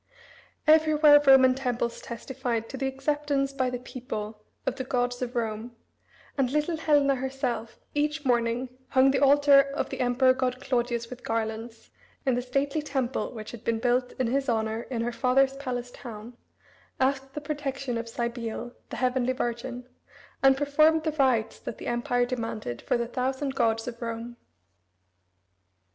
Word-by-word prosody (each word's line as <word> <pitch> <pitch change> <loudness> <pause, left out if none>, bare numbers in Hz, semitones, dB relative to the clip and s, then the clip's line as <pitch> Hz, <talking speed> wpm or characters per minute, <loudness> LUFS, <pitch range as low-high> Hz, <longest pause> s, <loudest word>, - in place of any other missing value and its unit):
Everywhere 305 -1 +6
Roman 260 -1 +8
temples 245 -3 -2
testified 235 -1 -4
to - - -6
the 270 0 -1
acceptance 275 0 -1
by 260 -2 0
the 250 - -3
people 230 -4 -6 0.2
of 265 - -1
the 260 - -2
gods 245 -1 -1
of 250 0 -3
Rome, 230 0 -3 0.6
and 260 -2 +3
little 300 +4 0
Helena 290 -3 +3
herself 260 -3 -3 0.2
each 300 0 -1
morning 240 0 +1 0.2
hung 265 +1 +4
the 270 - +1
altar 285 0 +7
of 275 +1 -3
the - - -5
emperor 255 +1 +4
god 255 -1 -1
Claudius 240 -3 -1
with 250 - -9
garlands 225 0 -4 0.3
in 260 - +3
the 245 - 0
stately 275 +4 -1
temple 265 -4 -2
which 215 -1 -7
had 240 - -10
been 230 -1 0
built 245 +2 +1
in 255 - -1
his 270 +3 0
honor 220 0 -1
in 235 -3 -2
her 240 - -1
father's 265 +2 +2
palace 245 -3 -4
town, 230 -1 -9 0.6
asked 270 0 0
the - - -2
protection 275 -4 -3
of 230 0 -4
Cybele, 235 0 -4 0.2
"the - - -5
Heavenly 255 0 +1
Virgin," 245 0 -4 0.5
and 270 0 +5
performed 310 +3 +3
the 315 - 0
rites 255 -7 +1
that - - -6
the - - -9
Empire 245 +1 +1
demanded 225 - -4
for - - 0
"the 235 - -1
thousand 265 +2 -2
gods 225 -2 +1
of 235 0 -6
Rome." 230 +1 -5
255 Hz, 160 wpm, -27 LUFS, 235-275 Hz, 0.6 s, Roman